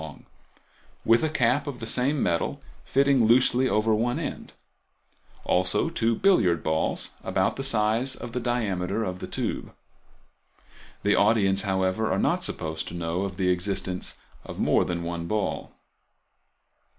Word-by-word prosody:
long, 80 -2 -10 0.8
with 115 +1 +5
a 155 - +1
cap 140 -1 +1
of 140 -3 -4
the 115 - -6
same 130 +5 +1
metal 85 -1 -1 0.2
fitting 135 -3 +3
loosely 125 +2 +4
over 110 0 +2
one 120 +3 0
end; - - -5 0.9
also 95 - +1
two 115 -4 +1
billiard 110 - +3
balls 80 0 0
about - - 0
the 135 - -4
size 115 +1 +2
of 120 - -8
the 125 - -2
diameter 110 -5 -1
of 90 -3 -4
the - - -6
tube. - - -4 1.3
The - - +3
audience, 100 -2 +3
however, 95 +2 0
are 95 - +1
not - - +1
supposed 80 -1 -2
to 85 - -7
know 85 +1 -2
of 95 -2 -4
the 90 -1 +2
existence 90 0 -2 0.3
of - - -9
more - - +3
than 85 -1 -3
one 85 0 -4
ball. 105 -1 -2
105 Hz, 150 wpm, -26 LUFS, 90-120 Hz, 1.3 s, with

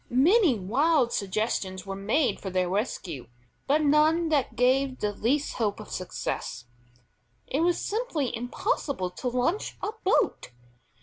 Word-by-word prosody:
Many 310 - +4
wild 255 - +2
suggestions 190 -2 -2
were 195 0 -4
made 220 +9 +1
for 195 - -5
their 185 -1 0
rescue, 180 - -3 0.4
but 300 +3 +3
none 310 +3 +4
that 280 -7 +1
gave 260 +2 +2
the 210 0 -1
least 275 +8 0
hope 210 -3 0
of 215 - -10
success. 120 -9 -4 0.8
It 275 - -2
was 345 +1 +2
simply 400 - -2
impossible 245 - -2
to 250 - -5
launch 255 - -1
a - - -2
boat. 385 - +1
250 Hz, 135 wpm, -27 LUFS, 200-305 Hz, 0.8 s, Many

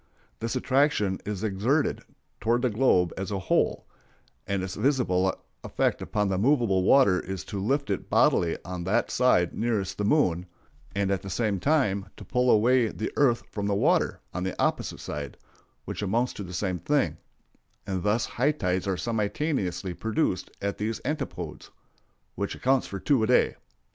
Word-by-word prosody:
This 115 +2 -3
attraction 130 -7 +2
is 105 -2 -3
exerted 110 +9 +1 0.4
toward 120 +4 +1
the 125 - +2
globe 105 -7 +3
as 95 +1 -3
a 100 - -2
whole; 95 - 0 0.6
and 100 -1 -1
its 95 -1 -4
visible 95 -10 +2 0.3
effect - - 0
upon 105 -1 -1
the 95 -1 0
movable 115 -6 +3
water 95 -2 +5
is 95 -4 -5
to 100 - -4
lift 140 +3 0
it 100 - -3
bodily 85 -1 +3
on 90 -1 -5
that 110 +5 +1
side 120 -9 +3
nearest 105 -5 -1
the - - 0
moon, 95 - +2 0.5
and 100 -1 +1
at 95 - 0
the 95 - -7
same 105 0 0
time 105 - +1
to - - -10
pull 125 0 +1
away 120 +2 +4
the 110 0 -4
earth 125 -5 +3
from 100 -1 -3
the 100 - +1
water - - +2
on 90 - -3
the 95 - -4
opposite - - 0
side, 75 -2 -6 0.5
which - - -5
amounts 115 +5 0
to - - -7
the 90 - -8
same 90 0 -2
thing; - - +1 0.7
and 95 -2 -2
thus 105 +3 +1
high 140 +5 +1
tides 90 -8 -1
are 95 -2 0
simultaneously 105 - -1
produced 110 - -1
at 100 0 -2
these 110 +2 -2
antipodes, 150 +1 -4 0.6
which 100 +6 -3
accounts 130 0 +1
for 100 - -5
the - - -13
two 140 -5 +3
a 110 - +2
day. - - +3
105 Hz, 175 wpm, -27 LUFS, 95-125 Hz, 0.7 s, water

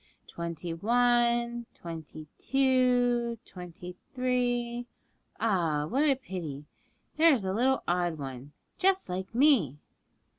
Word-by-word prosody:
'Twenty 170 0 -5
one, 240 +3 +2
twenty 160 -2 -8
two, 250 -3 +2
twenty 180 0 -10 0.2
three 245 -1 0 0.5
ah, 170 -9 +1
what 255 - 0
a 295 -3 +4
pity! 170 - -7 0.5
there 325 0 +6
is 210 -6 -3
a 190 - -1
little 260 +5 +2
odd 175 -2 0
one, 135 -1 -7 0.3
just 385 0 +2
like 190 +4 -5
me!' 240 - +4
235 Hz, 110 wpm, -29 LUFS, 170-250 Hz, 0.5 s, there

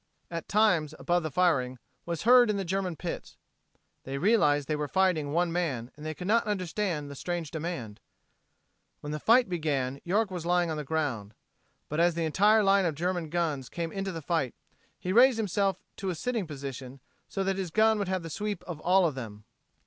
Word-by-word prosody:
at 165 -1 -5
times, 180 -8 +2
above 175 0 +1
the 155 - -3
firing, 140 -6 +1 0.3
was 170 -2 -3
heard 245 0 +7
in 210 - +1
the 195 - -2
German 185 -1 -1
pits. 170 +1 -6 0.7
They 135 +1 -4
realized 145 -6 +3
they 155 - 0
were 150 0 -2
fighting 180 -5 +1
one 170 +2 +1
man, 140 -9 -2
and 155 +1 -6
could 180 - -6
not 225 +3 +2
understand 185 -5 -2
the - - -6
strange 170 +2 -4
demand. 155 -10 -5 1.0
When 150 - -5
the 150 - -3
fight 240 - +5
began 140 -6 -2
York 200 +3 +1
was 180 -3 -4
lying 175 -1 +1
on 155 - -3
the 150 - -3
ground. 135 -9 -2 0.5
But 150 - -3
as 170 0 +3
the 170 -1 0
entire 210 +7 +4
line 195 -1 +4
of 160 - -2
German 175 0 -2
guns 150 -6 -1
came 165 -1 -4
into 195 -1 -3
the 165 -3 -6
fight, 155 -6 -1 0.4
he 185 - -3
raised 250 +2 +6
himself 200 -3 0 0.2
to 195 - -3
a 180 - -2
sitting 225 +2 -2
position 135 -2 -7 0.3
so 195 - -2
that 195 0 0
his 190 -3 -3
gun 220 +4 +3
would 200 - -1
have 185 -2 -1
the 165 - -7
sweep 210 +6 -3
of 170 -4 -7
all 185 +3 +4
of 160 - +1
them. 110 -5 -8
170 Hz, 200 wpm, -29 LUFS, 150-195 Hz, 1.0 s, heard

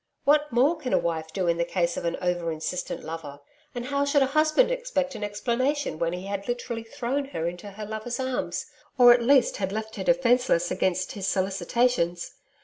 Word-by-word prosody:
What 295 0 +3
more 265 +8 +3
can 260 -5 -4
a - - +5
wife 160 -1 -2
do 185 +2 -1
in 170 0 +2
the 170 - +1
case 170 0 0
of - - -4
an 170 - -1
over 175 -2 0
insistent 160 +3 -4
lover? 155 -3 -7 0.4
And 240 0 -4
how 280 +1 0
should 285 0 +3
a 265 +1 -2
husband 310 +11 +4
expect 480 - -1
an 215 -3 -6
explanation 240 - -1
when 170 0 0
he 180 +2 -5
had 200 0 -4
literally 240 -1 -3
thrown 265 +4 -3
her 170 -12 -3
into 175 +4 -6
her 210 +2 -7
lover's 220 +4 -4
arms, 260 -1 -2 0.3
or 245 -1 +9
at 240 - +1
least 260 +1 +4
had 190 -1 -2
left 220 +1 -5
her 190 - -3
defenceless 245 -7 +2
against 185 0 0
his 195 -2 -4
solicitations! 190 -1 0
220 Hz, 200 wpm, -26 LUFS, 180-260 Hz, 0.4 s, or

